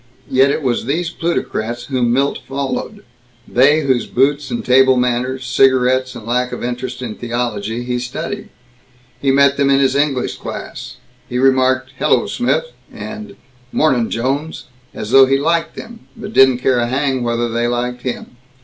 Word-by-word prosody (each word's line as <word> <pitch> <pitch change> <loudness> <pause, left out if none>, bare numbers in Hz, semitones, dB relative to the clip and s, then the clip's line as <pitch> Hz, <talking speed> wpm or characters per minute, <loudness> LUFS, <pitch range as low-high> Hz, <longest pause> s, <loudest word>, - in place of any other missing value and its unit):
Yet 130 +1 +4
it 145 - -1
was 120 -3 0
these 165 +6 -1
plutocrats 120 -9 -3
whom 125 -3 0
Milt 135 +3 +1
followed; 140 - -4 0.4
they 145 +5 +4
whose 130 -5 0
boots 140 +2 +1
and 120 -1 -4
table 130 0 +5
manners, 125 +1 -1
cigarettes 130 0 +2
and 115 -3 -9
lack 125 +2 0
of - - -6
interest 125 +1 -4
in 115 -3 -4
theology, 120 -1 -3
he 125 0 -2
studied. 125 0 -5 0.7
He 140 - +1
met 140 +1 +4
them 140 -1 +2
in 135 0 +4
his 135 -1 +2
English 140 -3 0
class. - - -8 0.3
He 125 - -2
remarked 130 0 +2
"Hello, - - +2
Smith," 250 - 0 0.3
and 215 0 -8 0.4
"Mornin', 130 -7 +2
Jones," 135 +7 -2 0.3
as 110 +1 -7
though 135 0 +7
he 135 +1 +3
liked 165 +3 0
them 230 0 -11
but 210 +1 -8
didn't 130 -2 +5
care 125 0 +1
a 120 - 0
hang 130 0 0
whether 120 0 -1
they 120 +1 -1
liked 120 +1 -2
him. 125 -1 -6
130 Hz, 165 wpm, -17 LUFS, 120-140 Hz, 0.7 s, though